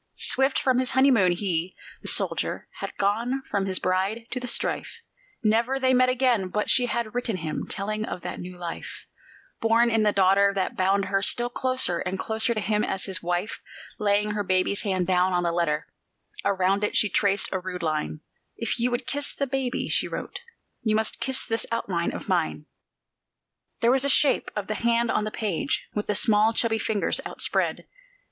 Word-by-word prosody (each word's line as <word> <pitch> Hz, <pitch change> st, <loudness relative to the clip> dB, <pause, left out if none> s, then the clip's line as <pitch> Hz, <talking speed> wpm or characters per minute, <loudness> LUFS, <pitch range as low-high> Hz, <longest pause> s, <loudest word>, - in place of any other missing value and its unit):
Swift 270 Hz, +1 st, +1 dB
from 255 Hz, -1 st, +2 dB
his 255 Hz, -1 st, +1 dB
honeymoon 245 Hz, -10 st, +5 dB
he, 175 Hz, -1 st, -2 dB, 0.3 s
the -, -, -8 dB
dead -, -, +4 dB
soldier, -, -, -2 dB
had -, -, -6 dB
gone 235 Hz, +7 st, 0 dB
from 195 Hz, -1 st, 0 dB
his 185 Hz, -1 st, +1 dB
bride 195 Hz, +5 st, -1 dB
to 255 Hz, -, -2 dB
the 250 Hz, -, -5 dB
strife; -, -, -1 dB, 0.4 s
Never 230 Hz, +5 st, +2 dB
they 260 Hz, -1 st, +3 dB
met 255 Hz, 0 st, +4 dB
again, 250 Hz, -6 st, +2 dB
but 210 Hz, +3 st, 0 dB
she 250 Hz, -1 st, +3 dB
had 235 Hz, -2 st, -2 dB
written 240 Hz, -4 st, -2 dB
him, 160 Hz, -3 st, -4 dB
telling 215 Hz, +2 st, -2 dB
of 180 Hz, -, -6 dB
that -, -, -5 dB
new 180 Hz, 0 st, -8 dB
life, 175 Hz, -1 st, -7 dB, 0.5 s
Born 230 Hz, +1 st, +3 dB
in 225 Hz, -1 st, +3 dB
the 210 Hz, -1 st, +3 dB
daughter, 200 Hz, +1 st, +4 dB
that 190 Hz, -1 st, -1 dB
bound 195 Hz, +1 st, +2 dB
her 195 Hz, +1 st, 0 dB
still 240 Hz, +4 st, +2 dB
closer 255 Hz, -10 st, 0 dB
and 185 Hz, +1 st, -3 dB
closer 220 Hz, +3 st, 0 dB
to -, -, 0 dB
him 210 Hz, 0 st, 0 dB
as 190 Hz, -, -2 dB
his 190 Hz, -2 st, -4 dB
wife. 175 Hz, +4 st, -2 dB, 0.4 s
Laying 210 Hz, 0 st, +2 dB
her 210 Hz, 0 st, -1 dB
baby's 185 Hz, +1 st, +2 dB
hand 190 Hz, -4 st, 0 dB
down 185 Hz, 0 st, +2 dB
on 175 Hz, 0 st, +1 dB
the 170 Hz, -, +1 dB
letter, 165 Hz, -3 st, 0 dB, 0.6 s
around 195 Hz, +1 st, +1 dB
it 210 Hz, -, +1 dB
she 215 Hz, -, +4 dB
traced 200 Hz, 0 st, +1 dB
a 190 Hz, -, -1 dB
rude 180 Hz, -1 st, -6 dB
line: 155 Hz, -1 st, -2 dB, 0.4 s
"If 230 Hz, +1 st, -2 dB
you 240 Hz, +2 st, +2 dB
would 245 Hz, 0 st, -2 dB
kiss 285 Hz, 0 st, -1 dB
the 280 Hz, -, -1 dB
baby," 265 Hz, -1 st, -2 dB
she -, -, +1 dB
wrote, -, -, -6 dB, 0.4 s
"you 215 Hz, -2 st, +1 dB
must 220 Hz, 0 st, -1 dB
kiss 265 Hz, 0 st, 0 dB
this 225 Hz, 0 st, -2 dB
outline 185 Hz, -7 st, -1 dB
of -, -, -7 dB
mine." -, -, 0 dB, 1.2 s
There 235 Hz, 0 st, +4 dB
was 265 Hz, 0 st, +3 dB
the 280 Hz, -, +2 dB
shape 280 Hz, +1 st, +3 dB
of 210 Hz, -, -2 dB
the 215 Hz, -, -2 dB
hand 235 Hz, +1 st, +1 dB
on 215 Hz, -, 0 dB
the -, -, -2 dB
page, 215 Hz, -, -2 dB
with 210 Hz, -, -3 dB
the 210 Hz, -, 0 dB
small, 215 Hz, +2 st, +3 dB
chubby 225 Hz, -1 st, +1 dB
fingers 210 Hz, -1 st, 0 dB
outspread. -, -, -1 dB
210 Hz, 195 wpm, -25 LUFS, 185-235 Hz, 1.2 s, honeymoon